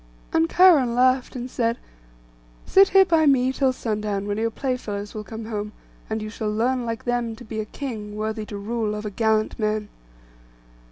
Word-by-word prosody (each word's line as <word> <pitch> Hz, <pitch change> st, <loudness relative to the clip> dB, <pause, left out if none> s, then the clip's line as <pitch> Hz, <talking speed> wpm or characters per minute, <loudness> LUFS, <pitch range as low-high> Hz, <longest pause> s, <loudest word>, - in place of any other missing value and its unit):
And 325 Hz, 0 st, +3 dB
Cheiron 305 Hz, -10 st, +5 dB
laughed, 255 Hz, +1 st, +2 dB
and 250 Hz, 0 st, -4 dB
said, 235 Hz, -2 st, -1 dB, 0.9 s
'Sit 390 Hz, 0 st, +6 dB
here 385 Hz, 0 st, +6 dB
by 325 Hz, -3 st, +3 dB
me 260 Hz, -2 st, +3 dB
till 265 Hz, -1 st, +2 dB
sundown, 210 Hz, -4 st, -3 dB
when 205 Hz, +1 st, -2 dB
your 230 Hz, +1 st, +1 dB
playfellows 220 Hz, -5 st, -4 dB
will 215 Hz, -, -5 dB
come 220 Hz, +3 st, -8 dB
home, 210 Hz, -1 st, -4 dB, 0.4 s
and 220 Hz, 0 st, -2 dB
you 215 Hz, -, -5 dB
shall 215 Hz, -1 st, -3 dB
learn 240 Hz, +3 st, 0 dB
like 230 Hz, -1 st, -4 dB
them 240 Hz, -2 st, -1 dB
to 240 Hz, +2 st, -12 dB
be 220 Hz, 0 st, -5 dB
a 215 Hz, -, -2 dB
king, 215 Hz, -5 st, -6 dB
worthy 215 Hz, 0 st, -3 dB
to 205 Hz, -, -6 dB
rule 215 Hz, +1 st, -2 dB
over 210 Hz, 0 st, -5 dB
gallant 220 Hz, +1 st, 0 dB
men. 215 Hz, -1 st, -1 dB
225 Hz, 180 wpm, -23 LUFS, 215-255 Hz, 0.9 s, Sit